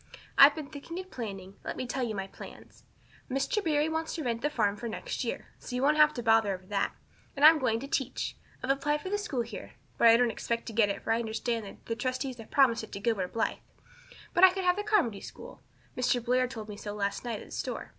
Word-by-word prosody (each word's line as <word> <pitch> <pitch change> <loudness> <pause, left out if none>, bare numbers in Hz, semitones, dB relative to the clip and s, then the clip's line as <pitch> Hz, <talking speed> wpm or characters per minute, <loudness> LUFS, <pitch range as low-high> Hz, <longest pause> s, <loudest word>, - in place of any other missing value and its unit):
I've 280 +1 +9
been 310 -2 -5
thinking 285 +4 -8
and 375 0 -7
planning. 195 -5 -7
Let - - -5
me 255 - -3
tell 260 +2 -3
you 230 -3 -1
my 195 -1 -3
plans. 195 - -13 0.4
Mr. 275 - 0
Barry 300 -2 +2
wants 320 0 -2
to 320 - -3
rent 235 -2 -1
the 295 - +1
farm 210 -8 +1
for 235 +3 -5
next - - -4
year. - - -4
So 250 - -6
you 250 - -1
won't 300 +2 +4
have 305 0 +6
any 240 - -3
bother 225 -3 +4
over 185 0 -13
that. 200 +1 -1 0.4
And 285 +1 +4
I'm 315 0 +9
going 230 -4 +1
to 275 - -6
teach. 270 -2 -2 0.3
I've 260 - +2
applied 295 +2 0
for 375 - -6
the 410 - +1
school 280 - -2
here 230 - -9 0.3
but 235 - +7
I 230 0 +8
don't 240 -1 +3
expect 230 +2 -3
to 225 - -6
get 215 -2 +4
it 200 - -4
for 225 - +1
I 230 - +1
understand 225 -1 -3
the 230 - -2
trustees 255 +1 -3
have 225 - -10
promised 255 -5 +4
it - - -10
to - - -4
Gilbert 200 -4 -1
Blythe. 230 - -1 0.7
But 345 - +3
I 375 - +11
can 380 +1 -3
have 360 0 +4
the 415 - -2
Carmody 380 - +1
school - - -11 0.3
Mr. 250 0 +2
Blair 255 +1 +2
told 225 -4 -7
me 210 -1 -8
so 205 0 -6
last 200 -1 -2
night 235 -4 -3
at - - -10
the - - -17
store. - - -4
245 Hz, 250 wpm, -30 LUFS, 225-295 Hz, 0.7 s, I